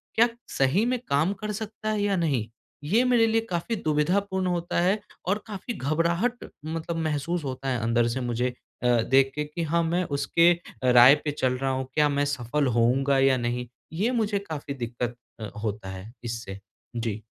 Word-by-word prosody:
क्या 230 Hz, +2 st, +6 dB, 0.3 s
सही 140 Hz, -, +3 dB
में 250 Hz, +1 st, 0 dB
काम 155 Hz, +7 st, +2 dB
कर 210 Hz, 0 st, -2 dB
सकता 215 Hz, +1 st, -5 dB
है 215 Hz, -1 st, 0 dB
या 205 Hz, -1 st, +1 dB
नहीं। 145 Hz, -, 0 dB, 0.4 s
ये 210 Hz, +12 st, +3 dB
मेरे 245 Hz, -2 st, +4 dB
लिए 225 Hz, 0 st, +2 dB
काफ़ी 175 Hz, +6 st, -1 dB
दुविधापूर्ण 185 Hz, +3 st, 0 dB
होता 175 Hz, -1 st, -1 dB
है। 190 Hz, +4 st, +2 dB, 0.3 s
और 200 Hz, +3 st, +2 dB
काफ़ी 210 Hz, +3 st, -5 dB
घबराहट 170 Hz, -, 0 dB, 0.2 s
मतलब 165 Hz, +1 st, -3 dB
महसूस 160 Hz, +1 st, -1 dB
होता 135 Hz, -1 st, -5 dB
है 125 Hz, -2 st, 0 dB
अंदर 115 Hz, +1 st, +2 dB
से 125 Hz, +3 st, -2 dB
मुझे 125 Hz, +1 st, -1 dB, 0.3 s
अ, -, -, +3 dB
देख 130 Hz, +3 st, +4 dB
के 150 Hz, -, -1 dB
कि 150 Hz, +3 st, -4 dB
हाँ, 170 Hz, +2 st, +1 dB
मैं 170 Hz, +2 st, +1 dB
अ, -, -, -5 dB
उसके 145 Hz, +5 st, +4 dB, 0.4 s
राय 125 Hz, +3 st, +9 dB
पे 150 Hz, -, +1 dB
चल 130 Hz, -3 st, 0 dB
रहा 135 Hz, +1 st, -1 dB
हूँ, 130 Hz, 0 st, -2 dB
क्या 150 Hz, +1 st, +3 dB
मैं 145 Hz, 0 st, +1 dB
सफल 140 Hz, +1 st, -1 dB
होऊँगा 135 Hz, +4 st, +3 dB
या 135 Hz, -1 st, +4 dB
नहीं। 120 Hz, 0 st, -2 dB, 0.3 s
ये 205 Hz, +9 st, +1 dB
मुझे 215 Hz, -4 st, 0 dB
काफ़ी 155 Hz, -7 st, -6 dB
दिक्कत 120 Hz, -1 st, -4 dB, 0.2 s
अ, 110 Hz, -, -5 dB, 0.2 s
होता 105 Hz, -2 st, -3 dB
है 95 Hz, +3 st, -8 dB
इससे। 115 Hz, -4 st, -5 dB, 0.4 s
जी। 115 Hz, -2 st, -3 dB
150 Hz, 185 wpm, -26 LUFS, 125-185 Hz, 0.4 s, राय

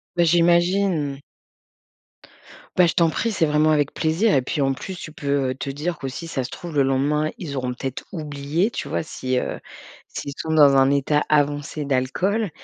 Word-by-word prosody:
Bah, 175 Hz, -, +3 dB
j'imagine. 175 Hz, -3 st, +2 dB, 1.6 s
Bah, 180 Hz, -1 st, +5 dB
je -, -, 0 dB
t'en 165 Hz, -2 st, +3 dB
prie, 230 Hz, +6 st, -1 dB
c'est 165 Hz, -6 st, +2 dB
vraiment 150 Hz, +1 st, +2 dB
avec 145 Hz, -2 st, +2 dB
plaisir 170 Hz, +8 st, +1 dB
et 135 Hz, -, +4 dB
puis, 140 Hz, +4 st, -3 dB
en 135 Hz, -1 st, +2 dB
plus, 185 Hz, +7 st, -7 dB
tu 155 Hz, -, -8 dB
peux, 140 Hz, -3 st, -1 dB
heu, -, -, -2 dB
te 135 Hz, +2 st, -6 dB
dire 155 Hz, +5 st, -3 dB
que 135 Hz, -, -4 dB
si 165 Hz, +6 st, -6 dB
ça 135 Hz, -5 st, -2 dB
se 125 Hz, -, -6 dB
trouve, 170 Hz, -2 st, -8 dB
le 140 Hz, -, +4 dB
lendemain, 145 Hz, +3 st, +1 dB
ils 150 Hz, -6 st, -6 dB
auront 125 Hz, -2 st, -2 dB
peut-être 130 Hz, +1 st, -5 dB
oublié 155 Hz, +4 st, -2 dB
tu -, -, -5 dB
vois? -, -, -2 dB
Si, 130 Hz, -4 st, -3 dB
heu, -, -, -3 dB, 0.5 s
s'ils 140 Hz, -, -6 dB
sont 160 Hz, -, -4 dB
dans 145 Hz, -3 st, +6 dB
un 135 Hz, 0 st, +5 dB
état 140 Hz, +1 st, +2 dB
avancé 145 Hz, 0 st, 0 dB
d'alcool 180 Hz, -, 0 dB
150 Hz, 195 wpm, -22 LUFS, 140-170 Hz, 1.6 s, dans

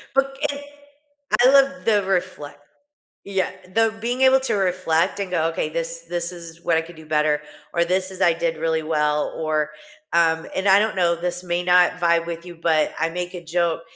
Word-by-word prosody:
Book 270 Hz, 0 st, +1 dB
it 285 Hz, 0 st, -2 dB, 0.8 s
I 255 Hz, -, +7 dB
love 275 Hz, 0 st, +3 dB
the 210 Hz, -3 st, +3 dB
reflect 185 Hz, -6 st, -3 dB, 0.6 s
Yeah. 195 Hz, -1 st, -1 dB, 0.2 s
The 225 Hz, 0 st, +2 dB
Being 245 Hz, +3 st, -2 dB
able 265 Hz, 0 st, +6 dB
to 265 Hz, -, -1 dB
reflect, 185 Hz, -2 st, 0 dB
and 195 Hz, -2 st, -4 dB
go, 165 Hz, -3 st, +1 dB
"Okay, 165 Hz, -2 st, -2 dB
this 165 Hz, +1 st, -4 dB
this 175 Hz, 0 st, -2 dB
is 170 Hz, -1 st, -11 dB
'What 165 Hz, -, +2 dB
I 160 Hz, -, +2 dB
could 170 Hz, +1 st, -12 dB
do 160 Hz, 0 st, -13 dB
better,' 150 Hz, -1 st, +1 dB, 0.3 s
or 170 Hz, -, +2 dB
this 185 Hz, +2 st, -1 dB
is 190 Hz, 0 st, -8 dB
'I 175 Hz, -2 st, +5 dB
did 165 Hz, 0 st, -2 dB
really 160 Hz, 0 st, -1 dB
well,' 150 Hz, -1 st, 0 dB
or, 155 Hz, -1 st, -1 dB, 0.4 s
um" 165 Hz, -1 st, +2 dB
and 190 Hz, +1 st, -1 dB
I 195 Hz, +1 st, +7 dB
don't 215 Hz, 0 st, 0 dB
know, 175 Hz, -2 st, +2 dB
this 175 Hz, +1 st, -4 dB
may 175 Hz, 0 st, -1 dB
not 180 Hz, 0 st, +4 dB
vibe 170 Hz, -1 st, +2 dB
with 170 Hz, 0 st, -6 dB
you, 175 Hz, -1 st, -10 dB
but 160 Hz, -2 st, +1 dB
I 165 Hz, -, +1 dB
make 180 Hz, +2 st, -5 dB
a 175 Hz, -1 st, -8 dB
joke, 170 Hz, 0 st, 0 dB
175 Hz, 200 wpm, -22 LUFS, 165-190 Hz, 0.8 s, I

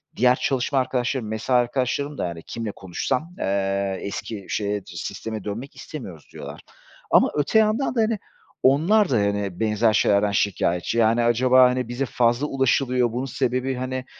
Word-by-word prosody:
Diğer 125 Hz, +1 st, +4 dB
çalışma 135 Hz, 0 st, 0 dB
arkadaşlarım, 130 Hz, -2 st, -1 dB
mesai 110 Hz, +4 st, -1 dB
arkadaşlarım 130 Hz, +4 st, -1 dB
da, -, -, -1 dB
yani, 85 Hz, -1 st, -7 dB
kimle 115 Hz, -2 st, -5 dB
konuşsam, 125 Hz, -, -3 dB
eee, 100 Hz, 0 st, -1 dB
eski 100 Hz, 0 st, -6 dB
şeye 105 Hz, 0 st, -1 dB
sisteme 110 Hz, -3 st, -6 dB
dönmek 115 Hz, +7 st, -6 dB
istemiyoruz 95 Hz, -, -9 dB
diyorlar -, -, -9 dB, 0.5 s
ama -, -, +5 dB
öte 150 Hz, +9 st, +3 dB
yandan 220 Hz, +5 st, +1 dB
da, 230 Hz, -, +3 dB
hani, 220 Hz, -1 st, 0 dB, 0.4 s
onlar 175 Hz, +10 st, +4 dB
da 130 Hz, -, +1 dB
hani 100 Hz, -3 st, -1 dB
benzer 110 Hz, 0 st, +2 dB
şeylerden 100 Hz, -1 st, +3 dB
şikâyetçi. 100 Hz, 0 st, 0 dB
Yani, 115 Hz, +1 st, +3 dB
acaba, 125 Hz, +2 st, +5 dB
hani, 125 Hz, -1 st, -2 dB
bize 120 Hz, +3 st, -2 dB
fazla 120 Hz, +3 st, +1 dB
ulaşılıyor 130 Hz, -3 st, +1 dB
bunun 125 Hz, +3 st, -3 dB
sebebi, 130 Hz, 0 st, -1 dB
hani, 130 Hz, 0 st, -4 dB
120 Hz, 150 wpm, -23 LUFS, 105-135 Hz, 0.5 s, ama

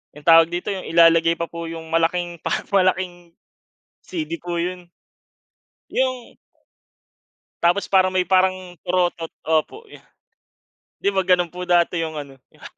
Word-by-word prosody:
yung 150 Hz, +2 st, -15 dB
tawag 165 Hz, 0 st, +8 dB
dito? 175 Hz, +4 st, -3 dB
Yung 190 Hz, -2 st, -5 dB
ilalagay 165 Hz, 0 st, +5 dB
pa 170 Hz, 0 st, -4 dB
po 170 Hz, 0 st, -7 dB
yung 165 Hz, -1 st, -8 dB
malaking 170 Hz, +1 st, 0 dB
parang -, -, -3 dB
malaking 185 Hz, -3 st, 0 dB, 0.7 s
CD 160 Hz, -3 st, -5 dB
po 175 Hz, -1 st, -3 dB
yun. 180 Hz, 0 st, -4 dB, 1.0 s
Yung 255 Hz, -2 st, -2 dB, 1.3 s
Tapos 175 Hz, +4 st, +2 dB
parang 185 Hz, -1 st, +3 dB
may 185 Hz, -, +2 dB
parang 185 Hz, -1 st, +1 dB
torotot. 175 Hz, -2 st, -1 dB
Opo, 160 Hz, -, -1 dB
yu -, -, -12 dB, 1.0 s
di -, -, -3 dB
ba 190 Hz, -, +2 dB
ganun 180 Hz, -1 st, +2 dB
po 180 Hz, +2 st, -8 dB
dati 175 Hz, -1 st, +2 dB
yung 160 Hz, -1 st, -5 dB
ano, 140 Hz, -2 st, -9 dB, 0.2 s
yung -, -, -22 dB
175 Hz, 140 wpm, -21 LUFS, 165-185 Hz, 1.3 s, tawag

